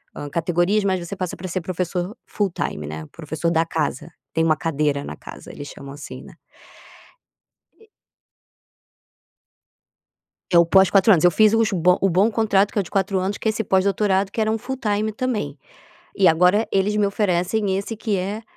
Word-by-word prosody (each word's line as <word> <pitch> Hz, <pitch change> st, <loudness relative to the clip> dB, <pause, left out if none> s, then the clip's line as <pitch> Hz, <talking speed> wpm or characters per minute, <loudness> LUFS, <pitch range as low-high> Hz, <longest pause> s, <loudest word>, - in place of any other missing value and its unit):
hã, 145 Hz, -, -6 dB
categorias 175 Hz, +6 st, +1 dB
mas 185 Hz, -3 st, 0 dB
você 200 Hz, -, -6 dB
passa 185 Hz, -2 st, -4 dB
pra 185 Hz, -, -6 dB
ser 185 Hz, +1 st, -2 dB
professor 180 Hz, +3 st, -3 dB
full 205 Hz, -3 st, -2 dB
time, 75 Hz, -, -4 dB
né, 75 Hz, +1 st, -6 dB
professor 160 Hz, +1 st, -3 dB
da 165 Hz, 0 st, +2 dB
casa, 160 Hz, 0 st, -3 dB, 0.2 s
tem 160 Hz, -, +1 dB
uma 155 Hz, -1 st, +3 dB
cadeira 145 Hz, -3 st, -1 dB
na 75 Hz, -, -7 dB
casa, -, -, -11 dB
eles 145 Hz, -, -9 dB
chamam 140 Hz, 0 st, -10 dB
assim, 145 Hz, -, -9 dB
né. -, -, -14 dB, 1.4 s
E 445 Hz, -, -21 dB, 2.7 s
É -, -, +7 dB
o 170 Hz, -, +5 dB
pós 190 Hz, +2 st, +5 dB
4 200 Hz, +2 st, +5 dB
anos, 170 Hz, -6 st, +4 dB
eu 175 Hz, -, +6 dB
fiz 215 Hz, +4 st, +4 dB
os 225 Hz, -1 st, +2 dB
bo 180 Hz, -1 st, +3 dB
o 195 Hz, -, +3 dB
bom 190 Hz, +6 st, +3 dB
contrato 205 Hz, -3 st, +2 dB
que -, -, -7 dB
é 205 Hz, -, +4 dB
o -, -, -4 dB
de 175 Hz, -, -14 dB
4 195 Hz, 0 st, 0 dB
anos 190 Hz, +2 st, -2 dB
que -, -, -4 dB
é -, -, +4 dB
esse 220 Hz, +1 st, -1 dB
pós-doutorado 195 Hz, 0 st, +1 dB
que -, -, -5 dB
era 220 Hz, 0 st, +1 dB
um 220 Hz, -, 0 dB
full 265 Hz, +3 st, -5 dB
time 215 Hz, -2 st, -1 dB
também. 210 Hz, -, -3 dB, 0.6 s
E 195 Hz, -, +4 dB
agora 180 Hz, +6 st, +4 dB
eles 200 Hz, +2 st, +1 dB
me 210 Hz, -1 st, +3 dB
oferecem 195 Hz, 0 st, 0 dB
esse 200 Hz, +3 st, -4 dB
que 215 Hz, -1 st, -1 dB
é 200 Hz, +4 st, -3 dB
190 Hz, 195 wpm, -22 LUFS, 170-210 Hz, 2.7 s, É